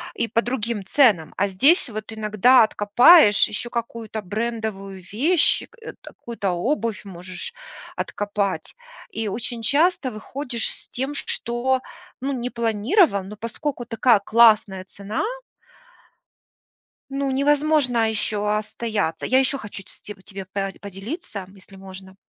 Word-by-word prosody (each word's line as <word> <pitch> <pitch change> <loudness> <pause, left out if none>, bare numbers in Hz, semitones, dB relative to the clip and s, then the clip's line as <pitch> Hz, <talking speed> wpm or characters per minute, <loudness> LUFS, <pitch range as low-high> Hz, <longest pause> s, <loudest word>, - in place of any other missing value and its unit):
и 230 - -2
по 230 +1 +2
другим 235 -4 -3
ценам. 200 - +3
А 200 - +1
здесь 270 - +3
вот 215 0 -7
иногда 220 +3 +4
откопаешь 215 - +6
еще 225 +3 -4
какую-то 230 -2 -5
брендовую 205 -2 -4
вещь, 300 - +3
к - - -22
э, - - -8
какую-то 225 -5 -5
обувь 225 - -2
можешь 185 -2 -7 0.4
откопать. 205 -1 -3 0.4
И 220 -1 -3
очень 230 +3 -4
часто 285 - +2
выходишь 240 +2 -3
с - - -7
тем, 265 +3 -4
что 255 +2 -1 0.4
ну 275 +2 -2
не 250 -2 -3
планировал, 230 - +2
но 200 +3 -9
поскольку 240 +5 -4
такая 230 -1 +3
классная 215 -3 +4
цена 200 +3 -5 1.9
ну 275 0 -2
невозможно 280 -4 +2
еще 210 -1 -1
остояться. 215 -6 -3
Я 260 - +3
еще 270 +1 +1
хочу 205 -4 -9
ц - - -18
ть 205 -2 -11
тебе 195 -1 -8
по 195 +1 -3
поделиться, 200 - -7
если 195 0 -16
можно. 190 0 -12
220 Hz, 130 wpm, -22 LUFS, 200-255 Hz, 1.9 s, откопаешь